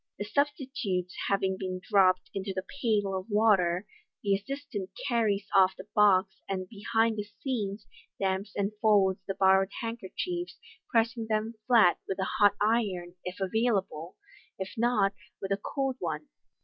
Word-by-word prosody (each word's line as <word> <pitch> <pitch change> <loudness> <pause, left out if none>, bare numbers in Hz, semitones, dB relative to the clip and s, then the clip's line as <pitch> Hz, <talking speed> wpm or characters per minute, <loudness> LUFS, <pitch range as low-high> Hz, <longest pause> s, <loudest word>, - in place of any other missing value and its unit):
The 205 - -4
substitutes 245 - -1
having 195 -1 +1
been 185 -1 -3
dropped 185 -2 +3
into 195 -1 -4
the 185 0 -3 0.2
pail 205 -5 +1
of 185 0 -4
watei, 200 -5 +3 0.4
the 200 -1 +2
assistant 205 -1 -4 0.2
carries 210 -4 +1
off 190 -1 +5
the 190 - -10
box, 195 -2 +4
and 185 -1 -2
behind 225 +2 0
the 210 - -1 0.2
scenes 215 -6 -3 0.3
damps 195 +1 -1
and 200 0 0
folds 195 -3 +4
the 195 - -2
borrowed 190 0 +4
handkerchiefs, 240 - -4 0.3
pressing 230 -1 +1
them 215 +1 0
flat 225 -8 +5
with 195 - -2
9 190 - -1
hot 205 -1 +6
iron, 205 -5 0
if 180 +1 -6
available 195 -5 -1 0.4
5 190 - -3
if - - -13
not, 220 -4 +2 0.3
with 195 - -5
a 195 - +2
cold 270 0 -2
one. 160 -4 -4
200 Hz, 150 wpm, -29 LUFS, 190-225 Hz, 0.4 s, hot